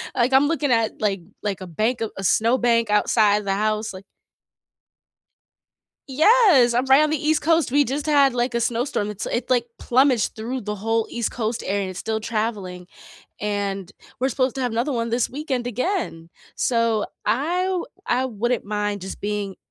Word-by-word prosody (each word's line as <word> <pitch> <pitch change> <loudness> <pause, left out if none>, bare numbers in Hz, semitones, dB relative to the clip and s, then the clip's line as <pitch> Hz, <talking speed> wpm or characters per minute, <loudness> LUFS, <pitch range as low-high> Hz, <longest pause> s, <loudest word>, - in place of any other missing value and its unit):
like, 250 +2 +1
I'm 275 +2 +5
looking 300 -4 0
at, 225 -2 +1
like 200 -3 0 0.2
like 195 -3 -3
a 185 - -7
bank 220 +9 -1
of 225 - -1
a 195 - -5
snow 230 +6 +3
bank 230 -2 +2
outside 210 0 +3
the 195 - 0
house, 215 +1 -1
like 190 +1 -11 2.0
Yes, 310 - +5
I'm 250 +2 +1
right 270 +3 +6
on 305 - +1
the 310 - 0
East 310 0 +2
Coast, 325 -4 +2
we 290 +1 +4
just 280 +3 -3
had, 280 -3 +4
like, 245 0 -1
a 235 - +1
snowstorm, 230 -3 -1
it's 210 - -5
it, 240 - -3
like, 245 -2 +2
plumaged 255 -2 +2
through 240 +3 -4
the 210 0 -4
whole 225 +2 0
East 235 -2 -2
Coast 225 -1 -3
area 200 +1 0
and 190 - -4
it's 185 - -8
still 220 0 -2
traveling, 210 -5 -3 0.5
and 200 -2 -3 0.3
we're 260 +2 +1
supposed 260 -2 0
to - - -3
have 245 -3 -1
another 245 +5 -1
one 230 -1 -1
this 235 +1 0
weekend 265 -3 -3
again, 245 - -2 0.3
so 230 -3 +1 0.2
I 330 +9 0
w 375 -2 -1 0.2
I 255 +2 +1
wouldn't 240 +1 -2
mind 205 -1 -2
just 190 +1 -7
being 205 -2 -3
230 Hz, 185 wpm, -22 LUFS, 210-260 Hz, 2.0 s, right